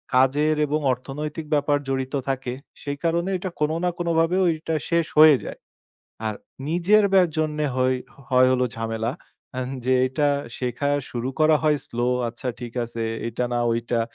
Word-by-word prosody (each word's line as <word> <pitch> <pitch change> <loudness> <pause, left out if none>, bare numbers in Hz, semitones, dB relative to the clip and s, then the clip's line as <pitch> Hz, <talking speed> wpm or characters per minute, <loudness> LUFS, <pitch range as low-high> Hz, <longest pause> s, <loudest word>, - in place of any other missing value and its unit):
কাজের 145 +4 +3
এবং 150 +1 0
অর্থনৈতিক 150 +5 -6
ব্যাপার 145 0 +2
জড়িত 130 0 -2 0.2
থাকে, 130 -2 -2 0.3
সেই 145 0 -4
কারণে 170 +2 +1
এটা 185 +1 -4
কোনো 150 +1 +1
না 180 - +3
কোনোভাবে 170 0 +2
ওইটা 165 -1 0
শেষ 170 -1 +2
হয়ে 155 -1 +9
যায়। - - -7 0.7
আর 110 - -1 0.3
নিজের 180 +6 +4
ব্যা 190 -2 +6
জন্যে 150 -1 0
হই 130 0 +2 0.3
হয় 130 -1 +5
হল 125 0 +1
ঝামেলা। 115 +1 -2 0.4
অ্যান 125 0 -3 0.2
যে 130 +1 +3
এটা 145 +3 +1 0.3
শেখা 125 +3 -1 0.2
শুরু 120 +1 -3
করা 155 0 +5
হয় 155 -1 +3
slow 120 +1 0 0.2
আচ্ছা 120 +2 -6
ঠিক 120 -2 -6
আছে, 115 0 -5 0.2
এইটা 115 +1 -2
না 120 - +1
ওইটা। 115 0 -1
145 Hz, 160 wpm, -24 LUFS, 125-155 Hz, 0.7 s, হয়ে